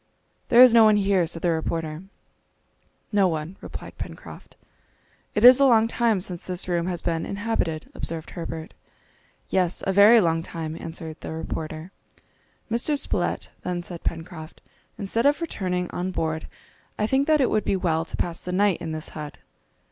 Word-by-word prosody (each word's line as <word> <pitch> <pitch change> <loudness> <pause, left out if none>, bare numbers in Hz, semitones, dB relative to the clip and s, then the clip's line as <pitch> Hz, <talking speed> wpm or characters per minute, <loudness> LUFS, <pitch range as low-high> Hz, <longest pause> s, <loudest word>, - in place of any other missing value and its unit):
"There 245 +1 +9
is 250 -2 +7
no 230 -1 +8
one 215 -1 +5
here," 195 -4 +2
said 165 0 -5
the 175 - +3
reporter. 160 -1 -3 1.1
"No 200 -3 +4
one," 160 +1 -3
replied - - -9
Pencroft. - - -9 0.8
"It 210 - +4
is 250 +1 +10
a 275 - +6
long 225 -4 +5
time 230 -4 +1
since 180 -1 -4
this 180 -1 -2
room 175 -1 0
has 180 -2 -3
been 165 -1 -1
inhabited," 200 -6 -3
observed 165 -1 -5
Herbert. 165 -2 -6 0.8
"Yes, 180 -2 0
a 195 - +1
very 210 +4 +8
long 165 -4 +1
time!" 160 -2 -6
answered 160 -1 -7
the - - -6
reporter. 160 +1 -5 0.8
"Mr. 245 +6 +1
Spilett," - - -1
then 175 -1 -3
said 175 -1 -8
Pencroft, 165 -1 -6 0.4
"instead 225 +5 +1
of 290 +2 +2
returning 185 - -2
on 180 +1 -3
board, 160 -3 -3 0.5
I 210 - +1
think 265 +5 +1
that 310 -1 +4
it 260 - +2
would 215 - +1
be - - 0
well 165 -3 0
to - - -6
pass 170 -1 -3
the 180 - -4
night 195 0 +2
in 160 -2 -4
this 155 0 -5
hut." 150 -2 -8
180 Hz, 170 wpm, -24 LUFS, 165-210 Hz, 1.1 s, is